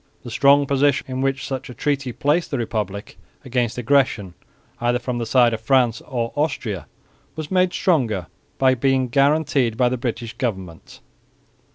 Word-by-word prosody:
The 120 - -8
strong 140 +3 +4
position 140 0 +2
in 130 0 -3
which 135 0 -1
such 135 -2 -5
a 125 - -9
treaty 140 -4 -1
placed 150 +8 0
the 140 - -2
Republic 105 -5 -4 0.3
against 125 -3 -1
aggression, 120 -7 +1 0.5
either 120 +1 +1
from 125 0 -4
the 115 - -3
side 120 -1 +4
of 110 - -4
France 125 -1 +2
or 120 -4 -3
Austria, 120 - -2 0.5
was 155 -2 -6
made 185 -1 +3
stronger 120 - +1 0.3
by 130 -1 +4
being 130 0 +1
guaranteed 140 -3 +2
by 125 0 +3
the 130 - -2
British 120 -2 -4
government. 95 -9 -5
125 Hz, 160 wpm, -21 LUFS, 115-140 Hz, 0.5 s, strong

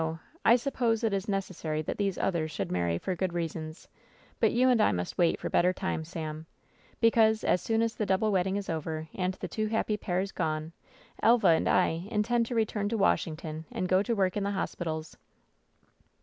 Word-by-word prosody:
I 230 - +7
suppose 240 -3 0
it 220 -3 +1
is 195 +1 -2
necessary 170 -6 -2
that - - -4
these 200 -2 0
others 165 -4 0
should 155 - -4
marry 85 -2 0
for 185 - -3
good 180 0 -2
reasons, 165 -1 -5 0.5
but - - +4
you 255 +2 +3
and 245 -3 +4
I - - +4
must 90 0 -3
wait 170 -1 +3
for - - -4
better 180 +1 +3
times, 175 -4 -3
Sam, 160 -2 -6 0.5
because, 225 -1 +4
as 180 - +2
soon 225 +3 +1
as 230 0 0
the 210 - -3
double 195 +3 +2
wedding 190 0 +1
is 200 -1 -3
over 160 -1 -4
and 185 0 -1
the - - -6
two 215 -1 -2
^happy' 215 -1 -1
pairs 185 +2 -1
gone, 155 -1 -2 0.5
Elva 230 -5 +5
and 160 - +3
I 180 0 +2
intend 230 +2 +1
to 245 - -4
return 210 -2 0
to 225 - -1
Washington 160 -5 0
and 185 - -2
go 185 +1 +3
to 230 +3 -1
work 190 -3 +1
in 205 - -1
the 200 - 0
hospitals." 165 -5 -4
190 Hz, 195 wpm, -29 LUFS, 160-215 Hz, 0.5 s, I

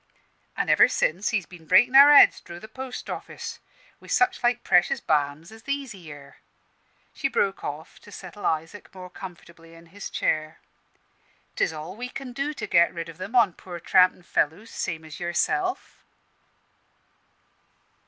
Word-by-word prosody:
"An' - - -1
ever - - +6
since 185 +6 0
he's 205 -6 -1
been 170 -3 -15
breaking 240 +9 +5
our 280 +2 +10
heads 290 - +7
dro' 170 - -10
the 215 - -11
post 260 +3 -8
office - - -7 0.4
wi' - - -16
such 375 0 +1
like 240 0 +1
precious 180 - +3
balms 150 +2 -1
as 225 0 -13
these 280 -1 -4
here." 145 - -12 0.8
She - - -1
broke 195 -1 -1
off 150 +3 -7
to 205 - -16
settle 195 +1 -6
Isaac 165 +6 -4
more 180 -1 -10
comfortably 170 -3 -12
in 165 0 -16
his 205 0 -7
chair. 155 0 -2 1.0
"'Tis - - +1
all 160 +4 -8
we 245 +3 -6
can 255 -1 -8
do 280 +3 -2
to 305 - -6
get 170 0 +4
rid 165 -1 -6
of 165 +2 -12
'em 200 +7 -6
on 225 -7 +4
poor 175 0 -9
trampin' 180 +1 +3
fellows 175 +7 -1
same 160 -1 -4
as 155 -1 -10
yourself." 180 - -2
185 Hz, 160 wpm, -25 LUFS, 165-230 Hz, 1.0 s, our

